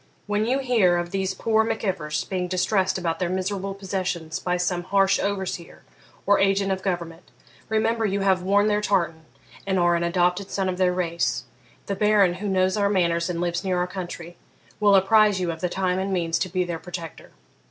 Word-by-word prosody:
When 210 +1 0
you 260 +3 +2
hear 230 -10 +3
of 175 0 -3
these 190 -1 -1
poor 220 +1 +2
Mac 225 0 -3
Ivors 150 -6 -2
being 180 -2 -3
distressed 190 +1 +1
about 170 -3 -2
their 180 -2 -1
miserable 195 +1 -2
possessions 185 -4 -3
by 180 0 -1
some 180 0 -1
harsh 195 0 +3
overseer 190 -4 -4 0.4
or 200 0 +4
agent 195 0 +2
of 190 0 -2
government, 175 -3 -4 0.4
remember 225 +1 +1
you 200 -1 0
have 190 -2 +2
worn 200 +2 +3
their 210 0 +1
tartan 170 -6 0 0.4
and 190 -1 +1
are 175 -1 +3
an 170 - 0
adopted 180 +2 +1
son 190 -1 -1
of 180 0 -4
their 185 -1 +3
race, 170 -2 -1 0.4
The 200 - -2
Baron, 205 -2 +3
who 210 - -2
knows 185 +1 +1
our 200 -1 +2
manners 170 -3 +1
and 170 -1 -2
lives 175 0 -1
near 185 -2 0
our 180 - +1
country, 175 -2 -7 0.4
will 205 -2 +5
apprise 205 +1 +4
you 175 -2 -1
of 160 -1 -8
the 180 - 0
time 185 0 -1
and 195 +1 -2
means 170 -3 0
to 185 - -1
be 185 +1 0
their 170 -2 -4
protector. 175 -2 -8
185 Hz, 200 wpm, -24 LUFS, 175-200 Hz, 0.4 s, will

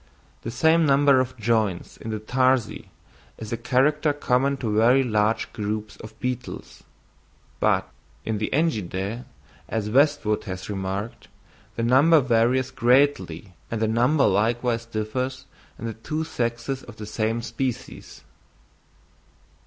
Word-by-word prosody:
The - - -5
same 160 +7 +3
number 140 -1 +5
of 130 0 -2
joints 110 -5 0
in 115 - -8
the 110 - -2
tarsi 130 +2 0 0.5
is 110 0 -6
a - - +1
character 145 +6 +2
common 140 0 +1
to 110 -5 -2
very 120 +5 +5
large 110 -2 0
groups 105 0 -4
of 110 - -12
beetles, 125 -1 -5 0.8
but - - +2 0.4
in 110 -2 -2
the 105 - -2
Engidæ, 110 - -1 0.4
as 105 -2 -2
Westwood 135 -5 +2
has 95 +1 -6
remarked, 95 +3 -4 0.5
the 115 - -2
number 140 +7 +5
varies 130 +1 +2
greatly 120 - +1 0.2
and 115 - -3
the 110 - +1
number 125 +6 +3
likewise 115 +3 +1
differs 125 +4 -3 0.3
in - - -7
the 115 - -3
two 155 +9 -4
sexes 120 -1 -3
of 115 - -12
the 105 - -8
same 110 +2 -2
species. 130 -1 -5
115 Hz, 130 wpm, -24 LUFS, 110-130 Hz, 0.8 s, number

